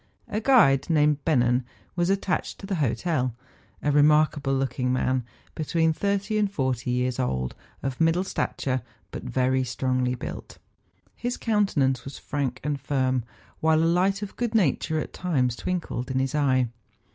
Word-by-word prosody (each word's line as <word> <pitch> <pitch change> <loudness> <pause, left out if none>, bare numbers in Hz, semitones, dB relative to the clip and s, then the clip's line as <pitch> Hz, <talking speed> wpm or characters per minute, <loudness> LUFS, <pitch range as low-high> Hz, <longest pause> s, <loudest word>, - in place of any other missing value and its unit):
A 215 - -2
guide, 200 - +5
named 150 -2 +3
Bennen, 125 -4 +3 0.3
was 175 0 +1
attached 195 -1 -1
to - - -9
the 195 -2 -2
hotel, 130 -1 0 0.5
a 145 - +2
remarkable 150 -1 +4
looking 130 -1 -1
man, 130 0 +1 0.3
between 160 +1 +1
thirty 200 +4 0
and 205 -2 +1
forty 130 - -1
years 125 +1 0
old, 65 - -1 0.3
of 135 +1 -3
middle 165 +3 +3
stature, 130 -8 -2 0.3
but - - -6
very 130 0 +1
strongly 125 0 0
built. - - -7 0.6
His 245 0 -3
countenance 150 - +1
was 135 - -8
frank 135 -3 -3
and 145 -2 -2
firm, 130 -3 0 0.4
while 160 0 +3
a - - +3
light 190 +4 +2
of 205 - -7
good 235 -2 -2
nature 160 - +2
at - - -5
times 130 -10 0
twinkled 150 -6 -3
in 130 - -1
his 135 0 0
eye. 130 -4 +2
145 Hz, 155 wpm, -26 LUFS, 130-175 Hz, 0.6 s, guide